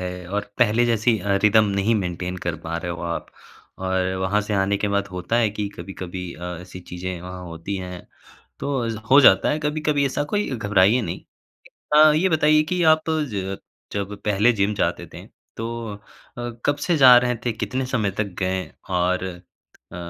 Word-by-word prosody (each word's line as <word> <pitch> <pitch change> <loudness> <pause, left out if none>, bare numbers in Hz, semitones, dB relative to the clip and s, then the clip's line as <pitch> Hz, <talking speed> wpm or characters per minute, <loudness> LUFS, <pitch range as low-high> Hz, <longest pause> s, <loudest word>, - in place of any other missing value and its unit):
है 90 -1 -6
और 100 +1 -3
पहले 120 0 +4
जैसी 115 -1 +2
अ, 100 +1 0
रिदम 110 +1 +5
नहीं 110 +4 +2
मेंटेन 90 -2 -3
कर 85 -2 -1
पा 80 +1 -3
रहे 85 +1 -4
हो 85 - -7
आप 85 -1 -3 0.5
और 95 0 0
वहाँ 100 +3 +1
से 105 0 -3
आने 100 +1 +1
के 105 +1 -1
बाद 100 0 0
होता 90 +5 -2
है 115 -3 +3
कि 105 -1 -3
कभी-कभी 90 0 -7
अ, 85 - -13 0.2
ऐसी 90 0 -10
चीज़ें 90 0 -6
वहाँ 90 +1 -8
होती 85 +3 -5
हैं, 90 -1 -7 0.5
तो 120 -6 -2
हो 140 - +8
जाता 140 - +6
है 150 - 0
कभी-कभी 150 -1 0
ऐसा, 135 - -1
कोई 205 +7 -1
घबराइए 105 -1 +3
नहीं। 85 -5 -4 0.7
हाँ, 155 0 +7
ये 180 +5 +3
बताइए 155 -2 +4
कि 180 - +1
आप 155 0 +1
ज 105 -12 -2 0.3
जब 100 0 -3
पहले 105 +3 +3
जिम 100 -1 +1
जाते - - -1
थे, - - -10 0.3
तो 115 -1 -5
अ, 100 - -11 0.7
कब 145 - +2
से 175 -2 +2
जा 130 -3 +9
रहे 125 0 0
थे, 120 - 0
कितने 130 +4 -3
समय 110 -6 0
तक 100 -4 -3
गए 95 0 -1 0.3
और 90 +1 +1 0.7
अ, - - -7
100 Hz, 185 wpm, -23 LUFS, 90-125 Hz, 0.7 s, जा